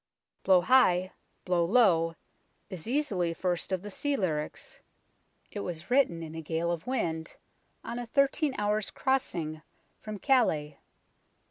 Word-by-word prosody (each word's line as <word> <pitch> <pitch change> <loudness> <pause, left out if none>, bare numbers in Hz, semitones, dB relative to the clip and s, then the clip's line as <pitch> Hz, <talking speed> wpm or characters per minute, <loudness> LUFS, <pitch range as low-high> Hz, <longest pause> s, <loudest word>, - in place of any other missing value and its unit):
" - - -50
Blow 185 -2 +5
High, 185 -5 +4 0.3
Blow 180 -2 +2
Low 170 -5 +3 0.3
" - - -43
is 185 0 -7
easily 210 - 0
first 175 0 -2
of 185 0 -1
the 205 - -7
sea 285 +8 -1
lyrics. 155 - -3 0.7
It 205 - -5
was 175 0 -6
written 240 -11 +3
in 160 -1 -8
a 160 - -5
gale 165 +2 -1
of 170 +3 -4
wind, 165 -11 -2 0.5
on 235 +1 -5
a 240 - -5
thirteen 275 +2 +1
hours' 210 0 0
crossing 170 -13 -1 0.4
from 215 -1 -6
Calais. 160 - +1
185 Hz, 145 wpm, -29 LUFS, 165-245 Hz, 0.7 s, Blow